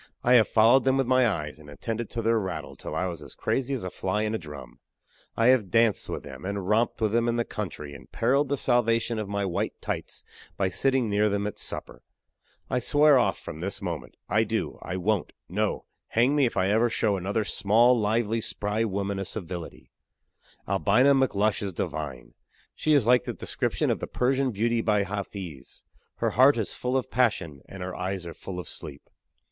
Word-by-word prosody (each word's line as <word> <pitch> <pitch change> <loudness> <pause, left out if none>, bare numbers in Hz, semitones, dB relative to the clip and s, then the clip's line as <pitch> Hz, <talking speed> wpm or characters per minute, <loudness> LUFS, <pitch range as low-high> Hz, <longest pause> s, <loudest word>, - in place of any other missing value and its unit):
I 125 - +4
have 115 -3 +6
followed 115 +4 +5
them 135 0 +3
with 135 - +2
my 130 0 +4
eyes, 80 -7 -3
and 75 -1 -13
attended 115 - -4
to 115 - -4
their 115 0 +3
rattle 95 -3 -5
till - - -7
I 90 - 0
was 85 -4 -5
as - - -11
crazy 135 +1 -1
as 125 - -5
a 90 - -4
fly 105 +3 -1
in 110 0 -1
a 110 - -1
drum. 75 -6 -10 0.6
I 115 +2 +4
have 120 -7 +3
danced 115 -1 +2
with - - -4
them, - - -10
and 100 -1 -3
romped 110 +3 +1
with 110 -2 +2
them 115 +1 +2
in 120 - +1
the 120 0 0
country, 80 -8 -6
and 70 - -13
periled 135 +4 +2
the 140 - 0
salvation 115 -2 +1
of 105 -2 -4
my 100 0 -1
"white 90 - -2
tights" - - -5 0.3
by 95 -1 +1
sitting 130 +6 +1
near 105 +1 +2
them 100 0 -1
at 105 - -4
supper. - - -5 0.7
I 125 - 0
swear 145 +2 +5
off 120 - +1
from 80 - -8
this 95 +3 -3
moment. - - -5
I - - +3
do. - - -3
I 90 - -4
won't 100 +1 0
no 105 +3 -1 0.2
hang 125 +5 +2
me 140 -3 +4
if - - -5
ever 105 +5 +3
I - - -3
show 110 -2 +1
another 100 +4 -1
small, 110 +5 +4
lively, 110 0 +1
spry 105 +1 -1
woman 100 -2 -2
a - - -1
civility. 90 -5 -7 0.8
Albina 105 +8 +4
McLush 110 -6 +2
is 100 -2 -3
divine. 75 -6 -5 0.4
She 155 - +1
is 140 -7 +4
like 125 +1 +4
the - - -3
description - - -1
of - - -1
the - - -4
Persian 130 +1 +1
beauty 115 +1 0
by 105 -2 +2
Hafiz: 95 -6 -7 0.3
"Her - - 0
heart 130 +3 +5
is 110 - -2
full 125 +1 -1
of 130 - -3
passion 95 - 0
and 95 -1 -7
her 90 0 -5
eyes 95 0 -3
are 85 - -6
full 90 -2 -7
of 90 - -7
sleep." 70 -1 -9
105 Hz, 205 wpm, -27 LUFS, 95-120 Hz, 0.8 s, have